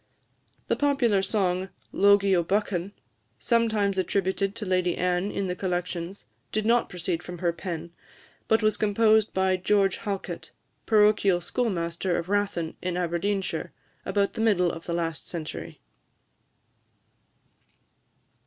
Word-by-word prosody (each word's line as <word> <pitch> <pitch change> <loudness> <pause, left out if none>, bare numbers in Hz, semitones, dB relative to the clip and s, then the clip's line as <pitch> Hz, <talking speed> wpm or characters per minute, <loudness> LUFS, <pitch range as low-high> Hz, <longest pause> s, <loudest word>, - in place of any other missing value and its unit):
The - - +1
popular 270 -9 +2
song, 190 -2 0 0.2
"Logie 200 -1 +4
o' 175 - +3
Buchan," 195 0 -1 0.5
sometimes 220 -5 +1
attributed 195 +2 0
to 220 - -4
Lady 185 -2 +1
Anne 180 +2 0
in 200 - -2
the 180 -1 -2
Collections, 180 0 -3 0.3
did 215 0 -1
not 235 +1 +3
proceed 175 -1 -3
from 175 0 -8
her 170 0 0
pen, 170 -1 -6 0.6
but 220 0 +3
was 215 0 +2
composed 215 +1 +3
by 190 0 +2
George 195 0 +2
Halket, 200 -3 -5 0.4
parochial 210 -4 +4
schoolmaster 175 -5 -1
of 170 +1 -4
Rathen, 200 -5 0
in 180 -1 -2
Aberdeenshire, 180 +3 -2 0.3
about 200 -1 0
the - - -3
middle 185 -6 +3
of 165 - -9
the 170 - -2
last 165 -2 -3
century. 160 -3 -6
190 Hz, 125 wpm, -26 LUFS, 175-210 Hz, 0.6 s, Logie